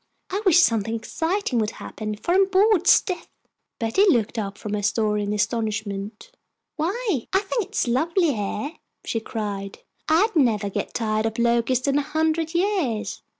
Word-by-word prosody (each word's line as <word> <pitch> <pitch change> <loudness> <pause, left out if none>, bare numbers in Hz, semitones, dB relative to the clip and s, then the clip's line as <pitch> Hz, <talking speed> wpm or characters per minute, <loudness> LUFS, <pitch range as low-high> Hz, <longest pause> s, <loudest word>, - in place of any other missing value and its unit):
I 390 +3 -1
wish 355 - +6
something 225 - +2
exciting 320 - -1
would 215 -1 0
happen, 215 -1 -5
for 345 +11 -1
I'm 385 +1 +4
bored 390 -1 +3
stiff." 360 -3 +3 0.5
Betty 230 - +2
looked 235 - +1
up 200 -1 -4
from 210 - -5
her 210 - -1
story 210 0 +1
in 205 0 -2
astonishment. 210 -1 -3 0.4
"Why, 360 - -1
I 385 - +3
think 415 +1 -2
it 410 +3 -14
is - - +1
lovely 320 +6 +2
here!" 210 +6 -3 0.3
she 225 - -1
cried. 205 -3 -5 0.3
"I'd 390 +7 +3
never 220 -9 +2
get - - -4
tired 215 -1 0
of 220 - -5
Locust 235 +2 +1
in 280 +1 +3
a - - +1
hundred 320 +2 -1
years!" 345 - 0
240 Hz, 165 wpm, -23 LUFS, 215-345 Hz, 0.5 s, wish